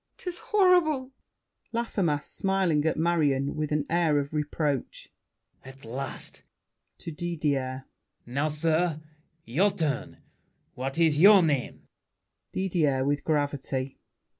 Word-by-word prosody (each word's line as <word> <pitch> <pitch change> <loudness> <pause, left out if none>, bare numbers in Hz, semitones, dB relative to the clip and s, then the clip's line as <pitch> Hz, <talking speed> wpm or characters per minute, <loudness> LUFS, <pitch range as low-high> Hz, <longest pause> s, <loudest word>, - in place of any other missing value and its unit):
'Tis 360 -1 -5
horrible! 350 -10 +3 0.6
LAFFEMAS 190 -10 -1
(smiling 190 -6 +1
at 160 - +1
Marion, 150 -5 +1
with 155 -1 -2
an 150 -1 0
air 165 -3 +2
of 145 +1 -2
reproach). 150 -2 -2 0.5
At 135 0 -13
last! 130 +4 -6 0.6
[To 165 - -7
Didier.] 145 -6 -2 0.4
Now, 140 +5 -1
sir, 155 +1 0 0.5
your 170 - +2
turn. 155 -8 -3 0.6
What 135 +3 -4
is 160 -3 +3
your 200 +1 +8
name? 145 -6 -1 0.7
DIDIER 155 -8 0
(with 145 +1 0
gravity). 140 -3 -2
150 Hz, 110 wpm, -27 LUFS, 140-175 Hz, 0.7 s, your